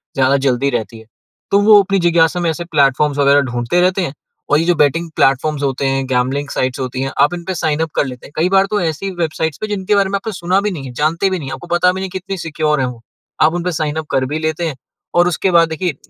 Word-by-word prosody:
ज़्यादा 135 +1 +3
जल्दी 135 +2 +1
रहती 115 -1 -4
है, 110 - -15 0.5
तो 200 - +5
वो 210 0 +7
अपनी 195 0 0
जिज्ञासा 170 0 +2
में 170 - +1
ऐसे 170 +2 -4
प्लेटफ़ॉर्म्स 145 -2 +2
वगैरह 140 0 +5
ढूँढते 120 +9 0
रहते 185 +1 +2
हैं। 155 -7 -3 0.4
और 150 - +5
ये 165 - 0
जो 175 - +3
बैटिंग 165 +3 +1
प्लेटफ़ॉर्म्स 140 +2 +1
होते 135 0 -1
हैं, 135 0 0
गैम्बलिंग 130 +3 0
साइट्स 130 0 -2
होती 130 0 -3
हैं, 135 0 -2
आप 145 - +4
इनपे 175 +1 -4
साइन 155 -2 -1
अप 160 - -1
कर - - +2
लेते 125 -2 -8
हैं। - - -18
कई 165 - +2
बार 195 0 +4
तो 210 - +1
ऐसी 165 +4 -2
वेबसाइट्स 160 -3 -2
पे, 215 - -2
जिनके 205 -1 -1
बारे 200 -1 +2
में 200 - -1
आपने 215 +3 -5
सुना 180 +1 0
भी 210 0 -1
नहीं 150 -7 -6
है, 130 - -7
जानते 165 +8 0
भी 185 - -1
नहीं 135 -4 -6
हैं, - - -5
आपको 140 - -12
पता 180 +1 +3
भी 190 - -5
नहीं 190 - -4
कि 190 +1 -5
कितनी 190 +1 -6
सिक्योर 155 -2 -1
हैं 130 - 0
वो, 120 -2 -8 0.4
आप 155 +1 +4
उनपे 175 +1 -2
साइन 155 -2 -2
अप 155 - -16
कर 130 - +1
भी 155 - -1
लेते 160 +2 -2
हैं। 155 - -4 0.4
और 175 0 +4
उसके 180 +2 0
बाद 170 -1 +4
देखिए, 160 0 -2
160 Hz, 270 wpm, -17 LUFS, 135-180 Hz, 0.5 s, वो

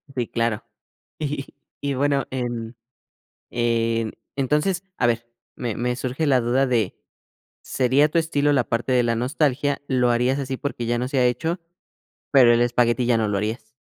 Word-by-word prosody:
sí, 120 -3 -1
claro, 115 -2 -1 0.6
y 145 -2 -3 0.4
y 140 - -1
y 135 - -1
bueno, 140 -1 +1
en 120 -2 -4 0.8
en 115 -1 0 0.2
entonces, 150 +7 0
a 125 - +3
ver, 120 0 0 0.3
me 115 -4 -3
me 125 0 -1
surge 130 +5 -2
la 130 -3 +4
duda 125 +3 +2
de: 115 -7 0 0.7
"¿Sería 135 +4 +2
tu 170 - -1
estilo 145 -3 +1
la 130 -3 +3
parte 115 +3 -1
de 125 -1 +4
la 115 -1 +1
nostalgia?", 140 +3 0
"¿Lo 125 -2 +2
harías 125 +3 +1
así 135 -1 -3
porque 125 -4 -4
ya 120 +1 0
no 125 - -1
se 135 - 0
ha 125 - +4
hecho, 160 +9 0 0.7
pero 125 -4 +7
el 120 - +3
espagueti 120 0 +2
ya 120 -1 +3
no 110 -1 0
lo 100 -1 0
harías?". 110 +2 -4
125 Hz, 175 wpm, -23 LUFS, 120-140 Hz, 0.8 s, pero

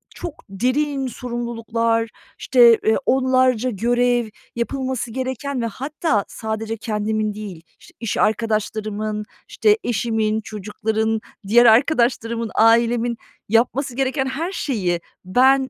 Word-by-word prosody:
çok 335 -4 -7
derin 265 +6 0
sorumluluklar, 230 -2 -2 0.3
işte, 240 -3 +6
eee, 220 - +4
onlarca 255 -2 +2
görev, 240 +1 +1 0.3
yapılması 255 0 -2
gereken 260 +1 -3
ve - - -1
hatta 265 - -1
sadece 220 0 -4
kendimin 215 -1 -1
değil, 200 -6 -8 0.2
işte, - - -18
iş 230 -3 -3
arkadaşlarımın, 215 -1 -1 0.2
işte, 425 0 +3
eşimin, 220 -1 0
çocukların, 220 +1 -2 0.3
diğer 240 +3 +6
arkadaşlarımın, 235 -2 +3
ailemin 235 +1 +3 0.3
yapması 245 +3 +1
gereken 265 +1 0
her 295 +7 -3
şeyi 190 - -1 0.2
ben 265 +7 +4
235 Hz, 105 wpm, -21 LUFS, 220-255 Hz, 0.3 s, işte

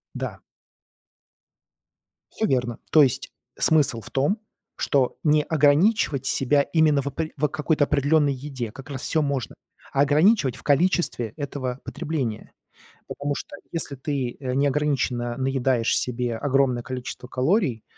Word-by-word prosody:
Да. - - -5 1.9
Всё 220 - -1
верно. 125 - 0
То 155 - +7
есть 130 - 0 0.3
смысл 145 -7 +3
в - - -12
том, 145 +11 +1 0.4
что 135 -3 +1
не 150 -1 +3
ограничивать 150 - +2
себя 135 +2 +2
именно 150 0 +2
в 140 - -6
опре 155 +3 -3
в, 150 - +1
а, - - +3
какой-то 150 0 +1
определённой 145 0 +2
еде, 130 -4 -6
как 135 +5 -12
раз 135 -3 -5
всё 155 +2 +1
можно, 140 -5 -2 0.4
а 135 - +3
ограничивать 150 - +3
в - - -13
количестве 145 - +1
этого 135 -3 -4
потребления. 130 -3 -4 0.6
Потому 145 0 -3
что - - -7 0.2
если 160 -4 -3
ты, 135 -2 -3
э, 130 -2 -3
неограниченно 135 -4 0
наедаешь 130 -3 +1
себе 125 -2 -2
огромное 135 -2 +1
количество 125 0 -6
калорий, 130 - 0
140 Hz, 135 wpm, -24 LUFS, 125-150 Hz, 1.9 s, То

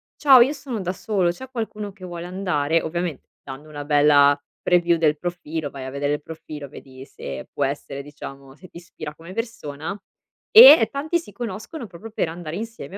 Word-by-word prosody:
"Ciao, 270 -4 +7
io 265 +5 +4
sono 265 -6 -6
da 180 0 -2
solo, 190 -3 0
c'è 260 +9 -10
qualcuno 215 -4 -5
che 185 -2 -11
vuole 175 -1 -7
andare?". 165 -4 0
Ovviamen 170 -2 -3 0.2
dando 135 +3 -9
una 145 -1 -7
bella 145 -1 +5 0.2
preview 175 -1 +3
del 155 -2 +2
profilo, 160 -3 -4
vai 135 -1 -8
a - - -5
vedere 145 +1 -1
il 150 - -3
profilo, 155 -3 -9
vedi 130 -1 -12
se 70 - -8
può - - -2
essere, 140 0 -5
diciamo, 140 -2 -11
se 185 +5 -15
ti - - -12
ispira 155 -3 -9
come 170 +3 -11
persona. 200 -7 -5 0.5
E 435 - +10
tanti 300 +5 -1
si 330 - -13
conoscono 230 - -6
proprio 195 +5 -11
per 190 - -1
andare 165 0 -6
insieme 225 -3 -7
170 Hz, 185 wpm, -23 LUFS, 145-215 Hz, 0.5 s, E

